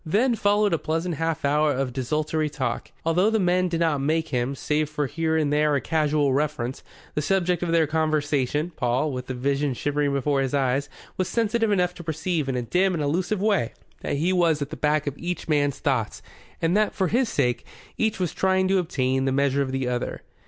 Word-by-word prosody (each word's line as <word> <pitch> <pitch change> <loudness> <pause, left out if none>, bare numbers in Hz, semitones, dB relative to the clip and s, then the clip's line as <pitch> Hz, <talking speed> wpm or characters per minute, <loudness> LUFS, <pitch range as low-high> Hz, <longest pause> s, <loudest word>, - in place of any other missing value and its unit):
Then 215 +10 +2
followed 205 -2 +2
a 165 - +1
pleasant 165 +3 -2
half 165 -2 -1
hour 150 +1 +3
of 130 -1 -2
desultory 150 +4 -1
talk. 130 -5 -3
Although 180 +5 +3
the 220 0 +1
men 180 -1 +2
did 170 -1 -1
not 155 -4 +1
make 160 +3 0
him, 125 +1 -1
save 150 +2 -1
for 150 -1 -1
here 160 +3 -1
and 150 -2 +1
there 150 0 +3
a - - +2
casual 150 0 +1
reference, 140 -3 -1 0.3
the 150 - -1
subject 180 +2 +1
of 175 - -1
their 165 -1 +4
conversation, 155 -1 0
Paul, 125 +5 0
with 125 -1 -5
the 130 - -4
Vision 140 +1 0
shimmering 145 +2 0
before 140 0 +1
his 135 +1 -1
eyes, 135 +1 0 0.3
was 185 - 0
sensitive 225 0 +1
enough 180 -3 +2
to 175 - -10
perceive 160 -2 -2
in 130 - -1
a 125 - -1
dim 185 +8 +1
and 155 - -1
elusive 180 +7 0
way 200 - +1 0.3
that - - -2
he 170 +6 +1
was 170 -4 +3
at 145 0 -4
the - - -4
back 150 0 +1
of 145 -2 -3
each 175 -1 -4
man's 145 -3 +1
thoughts - - -1 0.4
and 165 +3 +2
that, 215 0 +2
for 190 - +1
his 245 0 +1
sake, 125 - 0 0.3
each 220 -3 0
was 175 -3 -1
trying 190 0 +2
to 195 0 +3
obtain 130 -6 0
the 135 - +1
measure 140 +1 +2
of 135 -1 -1
the 135 -1 -1
other. 125 -1 -3
155 Hz, 215 wpm, -25 LUFS, 140-180 Hz, 0.4 s, their